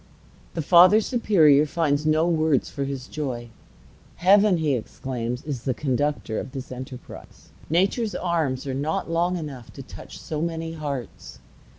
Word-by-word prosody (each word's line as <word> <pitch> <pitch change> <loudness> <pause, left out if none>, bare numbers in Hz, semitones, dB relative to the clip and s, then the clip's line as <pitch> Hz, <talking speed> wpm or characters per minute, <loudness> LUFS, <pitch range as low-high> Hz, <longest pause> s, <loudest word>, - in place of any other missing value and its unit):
The 165 - -2
Father 180 +6 +7
Superior 165 - +4
finds 150 -2 0
no 155 +2 +3
words 160 -5 +1
for 140 -2 -3
his 135 -1 -5
joy. 125 -6 -5 0.7
"Heaven," 200 +1 +5
he 155 -3 +1
exclaims, 125 0 -4
"is 140 -5 -4
the 130 -1 -2
conductor 140 -4 -1
of 130 - -7
this 135 -1 -7
enterprise. 130 0 -10 0.2
Nature's 195 +7 +1
arms 160 -7 -1
are 135 - -3
not 150 +4 -2
long 175 +2 +1
enough 140 -7 -8
to - - -9
touch - - -11
so 155 -1 -4
many 165 -1 -3
hearts." 140 - -6
150 Hz, 150 wpm, -24 LUFS, 130-170 Hz, 0.7 s, Father